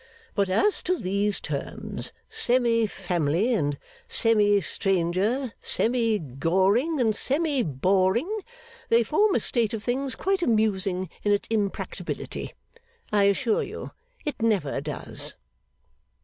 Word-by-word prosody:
But 200 -2 +1
as 390 - +2
to 365 - +3
these 200 - 0
terms, 140 -2 -4 0.2
semi 240 - +2
family 180 - 0
and 145 -9 0 0.3
semi 210 -3 +4
stranger, 195 - 0
semi 230 -2 +1
goring 190 - +1
and 220 -4 +2
semi 285 +2 0
boring, 190 - +1 0.5
they 230 +1 +5
form 415 - +2
a - - +3
state 230 -2 0
of 215 - -6
things 260 +2 -1
quite 385 -1 0
amusing 200 - +1
in 205 - +1
its 205 - +1
impracticability. 210 -3 -3 0.6
I 205 -1 +4
assure 215 +3 +2
you - - -6 0.3
it 295 -6 -4
never 195 -12 +1
does. 150 0 -2
215 Hz, 120 wpm, -26 LUFS, 190-245 Hz, 0.6 s, they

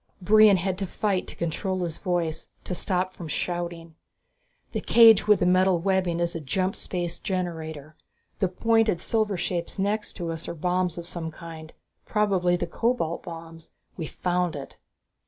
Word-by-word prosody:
Brion 210 +1 +6
had 185 +1 -2
to 195 - -2
fight 195 0 -1
to - - -9
control 185 +3 -2
his 165 -2 -4
voice, 175 -4 -2
to - - -3
stop 185 0 -1
from 170 - -8
shouting. 170 +1 -3 0.8
"The - - -2
cage 225 -3 +7
with 210 -1 +5
the - - +4
metal 185 0 +4
webbing 185 -1 +1
is 170 0 0
a - - -2
jump 185 +7 -1
space 175 -2 -3
generator. 160 -5 -4 0.4
The 190 - +3
pointed, 225 0 +2
silver 215 0 0
shapes 175 -1 -3
next 210 +2 -1
to 170 -3 -4
it 165 0 -6
are - - -5
bombs 180 +1 0
of 170 - -6
some 170 -2 -5
kind, 160 -1 -10 0.3
probably 195 -4 +2
the 175 - -1
cobalt 230 -9 -1
bombs. 165 -1 -10 0.2
We've 160 -4 -5
found 180 -2 -1
it!" 140 -1 -9
180 Hz, 165 wpm, -26 LUFS, 165-190 Hz, 0.8 s, cage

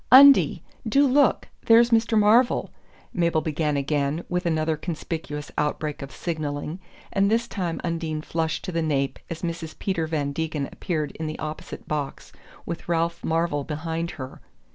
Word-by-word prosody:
"Undie, 275 +2 +8 0.3
do 280 +6 +5
look 280 0 +3 0.2
there's 235 +1 +7
Mr. 225 0 +3
Marvell!" 225 +4 +4 0.4
Mabel 170 -3 +2
began 150 -2 0
again, 140 +2 0
with 180 0 0
another 160 -1 +1
conspicuous 155 -2 -5
outbreak 150 0 -1
of 135 -1 -7
signalling; 155 0 -3 0.3
and 200 0 +3
this 230 +2 +2
time 180 -7 -3
Undine 165 -2 -2
flushed 160 0 -2
to 185 - -3
the 165 -1 0
nape 140 -4 0
as 165 +1 -6
Mrs. 165 -2 -4
Peter 165 -5 -1
Van 145 -3 -1
Degen 155 -2 -2
appeared 155 -6 -2
in 160 - -3
the 155 - -4
opposite 155 0 -6
box 145 -2 -4 0.3
with 170 0 -6
Ralph 170 0 0
Marvell 165 -3 0
behind 160 +3 -3
her. 130 -2 -8
160 Hz, 155 wpm, -25 LUFS, 150-180 Hz, 0.4 s, Undie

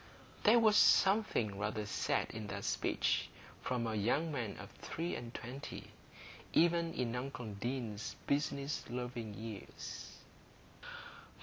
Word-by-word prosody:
There 220 +3 +8
was 220 -2 +6
something 190 - +5
rather 105 +1 -1
sad 100 - 0
in 110 -2 -5
that 100 0 -4
speech - - +1 0.3
from 125 -2 -1
a 110 - -1
young 120 +10 +1
man 120 -8 -3
of - - -9
three 170 +2 -4
and 120 -1 -5
twenty, 125 +3 -7 0.6
even 170 0 +4
in 120 -1 -1
uncle 125 -4 -4
Deane's 110 0 -3
business 140 0 0
loving 120 -3 -4
ears. 110 -2 -7
125 Hz, 120 wpm, -36 LUFS, 110-145 Hz, 0.6 s, There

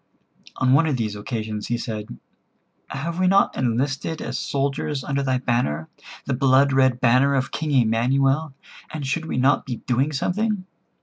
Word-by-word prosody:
On 130 0 +2
one 160 +4 +4
of 145 -4 0
these 110 -3 -2
occasions, 110 0 -4
he 120 - -1
said: 110 -3 -6 0.7
"Have 165 +6 -4
we 185 - +3
not 195 +2 +3
enlisted 135 +6 -1
as 125 +1 -4
soldiers 140 0 -2
under 140 +1 -1
thy 130 -2 +1
banner, 120 - -1 0.4
the 140 - -1
blood 135 +1 +4
red 130 -2 +3
banner 130 +3 +4
of 130 -1 -1
King 155 0 -3
Emanuel, 135 +4 +2 0.4
and 155 -2 -5
should 160 +4 -2
we - - -3
not 135 +2 +3
be 125 - -4
doing 130 +4 +1
something? 200 +7 -1
135 Hz, 165 wpm, -23 LUFS, 120-145 Hz, 0.7 s, one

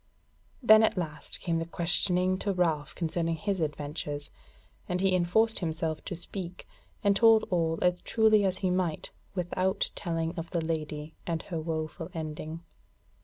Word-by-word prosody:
Then 220 -1 +8
at 220 - +2
last 155 -4 -4
came 165 -1 0
the 165 - -2
question 180 +2 +1
to 200 0 0
Ralph 160 -5 0
concerning 165 0 0
his 195 +3 -2
adventures, 150 -1 -3 0.6
and 180 - 0
he 190 0 +3
enforced 185 +6 +3
himself 160 -2 -2
to 185 - -4
speak, 180 +1 -6 0.4
and 200 -1 +4
told 225 +1 +6
all 165 -2 +1
as 180 0 +2
truly 220 -2 +4
as 190 -1 +1
he 185 - +3
might, 180 -4 -1 0.2
without 185 +1 0
telling 165 -2 -2
of 165 - -6
the 170 -3 -1
Lady 155 -1 -3
and 165 -2 -1
her 170 -4 -4
woeful 160 +1 -3
ending. 155 0 -5
170 Hz, 155 wpm, -29 LUFS, 160-185 Hz, 0.6 s, Then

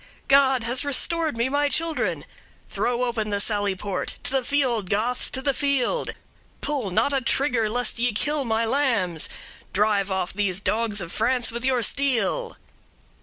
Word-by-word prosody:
God 270 -3 +4
has 245 +3 0
restored 310 +1 +1
me 235 +2 +1
my 285 +2 +1
children! 330 +1 0 0.5
Throw 245 0 0
open 230 -3 -1
the 205 -1 -1
sally 205 -2 +1
port; 190 0 -4
to - - -4
the 265 -1 +1
field, 245 -8 0
60ths, 230 +5 0
to 265 - -3
the 275 -1 +2
field! 280 - 0 0.5
pull 275 -9 -2
not 235 +10 +1
a 270 - +1
trigger, 240 -3 0
lest 245 0 -1
ye 245 +1 +2
kill 295 +7 +1
my 225 -1 0
lambs! 225 - 0 0.4
Drive 205 -1 +2
off 190 -1 -2
these 195 -2 0
dogs 215 0 0
of 170 -1 -6
France 245 +2 0
with 235 +1 -5
your 255 -2 +1
steel!'" 280 - 0
240 Hz, 165 wpm, -24 LUFS, 210-275 Hz, 0.5 s, God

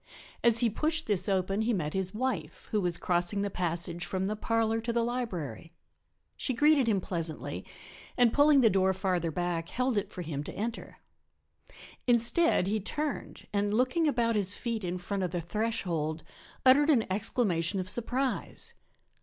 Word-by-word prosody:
As 235 -1 +6
he 235 - +3
pushed 315 +7 -1
this 205 -1 0
open 195 +2 +1
he 230 +2 +1
met 155 -7 -2
his 190 -1 0
wife, 215 -9 -3
who 210 - +1
was 175 -2 0
crossing 180 +3 0
the 200 - -2
passage 175 -1 -2
from 185 +2 -2
the 210 +2 -1
parlor 225 +1 0
to 235 +1 -2
the 235 0 +1
library. 180 - -4 0.6
She 260 - -2
greeted 295 -1 +4
him 210 -4 +3
pleasantly 165 -4 -4 0.5
and 245 -2 +4
pulling 290 -1 +6
the 225 - +6
door 190 0 +2
further 180 -3 0
back 170 0 -2
held 255 -3 +1
it 200 0 -7
for 180 - -6
him 150 -3 -4
to - - -7
enter. 225 +3 -5 1.1
Instead 240 - +4
he 210 +3 0
turned 295 +8 -4
and, 205 +1 +1
looking 260 +7 +2
about 235 -5 +2
his 200 -1 +1
feet 230 -3 -3
in 180 0 -2
front 195 +2 -3
of 180 - 0
the 175 +1 -2
threshold, 170 -5 -2 0.4
uttered 285 +4 +6
an 245 -8 +4
exclamation 195 -3 +1
of 185 - -3
surprise. 245 +5 -2
205 Hz, 170 wpm, -30 LUFS, 180-240 Hz, 1.1 s, As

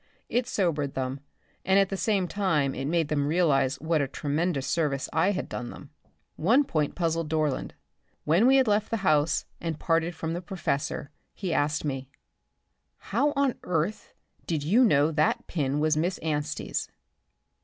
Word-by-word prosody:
It 245 0 0
sobered 155 - -1
them, 130 +1 -2 0.4
and 190 +1 +3
at 195 -1 +4
the 195 - -2
same 195 -2 +1
time 160 -8 +1
it 135 - -4
made 160 0 0
them 145 -2 0
realize 145 -5 +2
what 160 0 +1
a 140 - 0
tremendous 145 +1 -1
service 145 -5 0
I 165 +5 +3
had 195 -2 -2
done 120 -1 -5
them. 145 - -11 0.5
One 230 - +4
point 155 - -1
puzzled 165 -2 -1
Dorland. 155 -4 -1 0.5
When 170 +10 +4
we 265 - +6
had 265 -2 +4
left 210 0 +2
the 215 -4 -2
house 150 -1 +2
and 165 -2 -3
parted 165 0 +1
from 160 0 -3
the 175 - -3
professor, 155 -6 -3 0.2
he 185 -4 -3
asked 150 0 0
me: 135 -2 -3 0.9
"How 295 +1 0
on 275 -2 +2
earth 180 +4 -2 0.3
did 155 -4 -1
you 210 - +4
know 150 - +4
that 155 -1 +1
pin 145 -3 -1
was 155 0 +2
Miss 175 +4 0
Anstey's?" 150 -2 -2
160 Hz, 165 wpm, -27 LUFS, 145-185 Hz, 0.9 s, we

